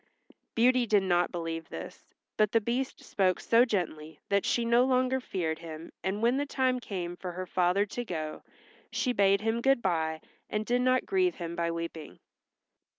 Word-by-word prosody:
Beauty 245 +1 +4
did 205 -2 +4
not 175 -1 +2
believe 165 -2 -4
this, - - -8 0.3
but 215 -2 +2
the 230 - +5
Beast 240 +4 -3
spoke 185 -3 +1
so 235 +2 +4
gently 160 -8 -3
that 200 0 +2
she 235 - +1
no 235 +1 +4
longer 255 0 +2
feared 170 -10 -3
him 160 -1 -9
and 195 +4 -2
when 240 +3 +3
the 285 - 0
time 260 -2 +1
came 180 -7 -5
for 180 0 -6
her 185 +1 -4
father 180 +2 +2
to 245 +4 -5
go 155 -7 -5 0.5
she 250 - 0
bade 200 -2 +3
him 225 +1 0
good 270 0 +4
by 160 -3 0 0.3
and 210 0 -2
did 245 +2 +1
not 255 0 +2
grieve 370 -2 +1
him 170 -1 -5
by 170 0 0
weeping. 165 - -5
200 Hz, 180 wpm, -29 LUFS, 170-245 Hz, 0.5 s, the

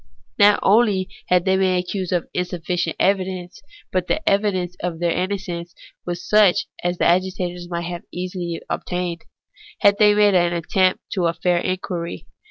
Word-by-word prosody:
Not 205 0 +6
only 200 -3 +3 0.2
had 180 -1 +3
they 190 0 +3
been 185 -1 +2
accused 180 0 -3
on 175 -2 0
insufficient 175 -1 -2
evidence, 185 -2 -1 0.3
but 185 -1 -1
the 315 - -2
evidence 190 -3 +1
of 175 -2 -3
their 170 0 0
innocence 180 -2 -3 0.3
was 175 0 -4
such 210 -4 +4 0.2
as 175 0 -1
the - - +1
agitators 180 -1 0
might 170 0 -4
easily 180 -1 -4
have 165 - -4
obtained, 180 -2 -4 0.6
if 200 0 +6
they 210 -1 +7
had 205 -1 +4
attempted 180 +2 +1
a 170 0 +1
fair 175 +1 +1
inquiry. 175 - -4
180 Hz, 150 wpm, -21 LUFS, 175-190 Hz, 0.6 s, they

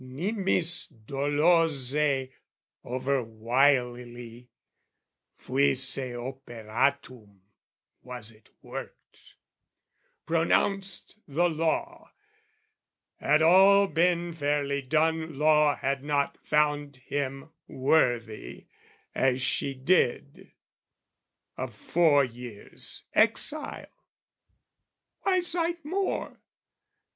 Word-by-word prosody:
Nimis 175 - 0 0.2
dolose, 145 -1 +1 0.5
overwilily, 125 -1 -1 0.9
Fuisse 135 -1 +2
operatum, 120 -3 -4 0.6
was 125 -3 -8
it 110 0 -23
worked, - - -11 0.9
Pronounced 195 +5 0
the 165 +5 +1
law: 175 - -2 1.1
had 150 +1 +2
all 195 +4 +6
been 175 0 +1
fairly 145 -2 -1
done 160 +2 0
Law 150 -1 +4
had 135 0 -2
not 145 -1 0
found 145 -1 0
him 135 +3 -5 0.2
worthy, 120 -5 0 0.5
as 130 -1 +1
she 135 +1 0
did, 130 - 0 1.1
Of 125 -4 -5
four 150 +4 +3
years' 120 -3 -8
exile. 255 +7 0 1.2
Why 370 -2 +1
cite 340 -2 0
more? 380 +5 -3
140 Hz, 70 wpm, -27 LUFS, 125-165 Hz, 1.2 s, all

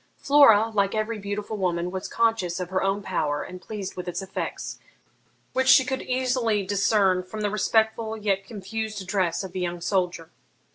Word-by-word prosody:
Flora, 230 -7 +6
like 200 0 +1
every 215 0 -2
beautiful 205 +2 -4
woman, 180 -2 -1
was 190 +1 -4
conscious 210 -6 0
of 180 0 -5
her 185 - +1
own 195 +1 0
power, 150 -6 -1
and 180 0 -9
pleased 200 -1 -6
with 180 0 -6
its 175 - -3
effects, 195 -1 -5 0.7
which 260 0 +1
she 260 0 +7
could 265 +1 -2
easily 250 -5 0
discern 200 -1 +2
from 215 +4 -7
the 205 -1 0
respectful 220 +1 +1
yet 200 -2 0
confused 215 +1 -5
address 190 -2 -1
of 190 - -7
the 185 - -4
young 175 -1 -2
soldier. 175 -2 -1
200 Hz, 175 wpm, -25 LUFS, 185-220 Hz, 0.7 s, she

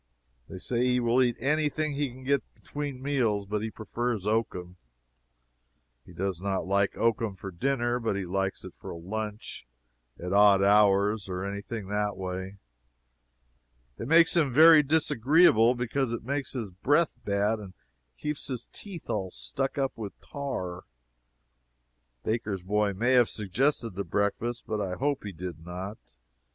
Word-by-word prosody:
They 95 - -7
say 120 +6 -1
he 125 0 +2
will 120 +1 +3
eat 120 -2 +2
any 150 +4 +2
thing 155 0 -2
he 140 -1 -1
can 130 +2 -12
get 140 +1 +2
between 145 -3 -6
meals, 120 -8 +1
but 105 +1 -2
he 110 - -3
prefers 115 -1 -3
oakum. 95 -5 -2 1.3
He 90 - -15
does 90 0 -3
not 95 -1 -1
like 100 +1 +1
oakum 115 -3 +1
for 95 +1 -8
dinner, 120 +4 0
but 115 -4 -1
he 100 -1 -3
likes 95 +2 -2
it - - -9
for - - -11
a - - -6
lunch, 105 - -6 0.5
at 90 +2 -4
odd 100 -1 +6
hours, 100 0 +4
or 90 0 -3
any 100 0 -4
thing 110 -1 -6
that 105 -1 -1
way. 95 +1 -5 1.4
It 115 - -4
makes 165 +4 +6
him 155 -6 +3
very 160 +3 +8
disagreeable, 145 -4 +4
because 125 +1 -1
it 120 - -4
makes 140 +3 -2
his 115 -7 -4
breath 145 - +2
bad, 100 +2 +1
and 95 -3 -10 0.4
keeps 150 -1 -4
his 130 -4 -3
teeth 190 -6 -9
all 95 -3 -2
stuck - - -3
up 135 -1 -1
with 105 -3 -7
tar. 95 -12 -5 1.4
Baker's 110 -4 -2
boy 105 +1 0
may 120 +6 +1
have 125 -3 +5
suggested 115 +4 0
the 100 +2 -4
breakfast, 105 +6 -1
but 110 -1 -2
I 95 -2 -2
hope 140 +3 -1
he 105 - -5
did 85 -2 -7
not. 90 +5 -6
110 Hz, 160 wpm, -28 LUFS, 95-130 Hz, 1.4 s, very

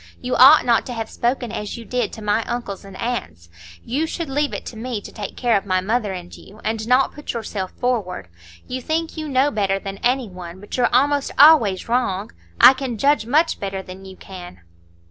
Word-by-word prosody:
You 250 0 -2
ought 275 +5 +8
not 235 -2 +2
to 250 - -5
have 225 -1 -5
spoken 240 -1 -1
as 210 -1 -5
you 230 - -9
did 245 -2 -2
to 220 - -9
my 210 +2 +1
uncles 235 -5 -5
and 195 -1 -11
aunts; 85 - -4 0.4
you 290 +7 -1
should 325 -3 -5
leave 290 +1 0
it - - -6
to - - -8
me 230 0 -4
to - - -11
take 205 -3 -7
care 240 -3 +2
of 200 - +1
my 185 -1 +2
mother 210 +2 -1
and 180 -1 -8
you, 210 +2 -15
and 220 0 -2
not 255 +2 +3
put 295 - -6
yourself 210 -5 -4
forward. 210 - -2 0.4
You 255 +1 -4
think 320 +4 -2
you 310 -2 -5
know 270 +2 +2
better 195 -5 0
than 195 0 -7
any 250 0 +1
one, 180 -1 -10
but 205 - -7
you're 250 - +2
almost 280 +3 +2
always 275 -11 +6
wrong. 225 -5 -1 0.3
I - - +9
can 260 -3 -4
judge 280 -2 +2
much 310 +6 +2
better 195 -1 -4
than 185 +1 -11
you 190 0 -10
can." 180 - -11
230 Hz, 215 wpm, -21 LUFS, 195-260 Hz, 0.4 s, I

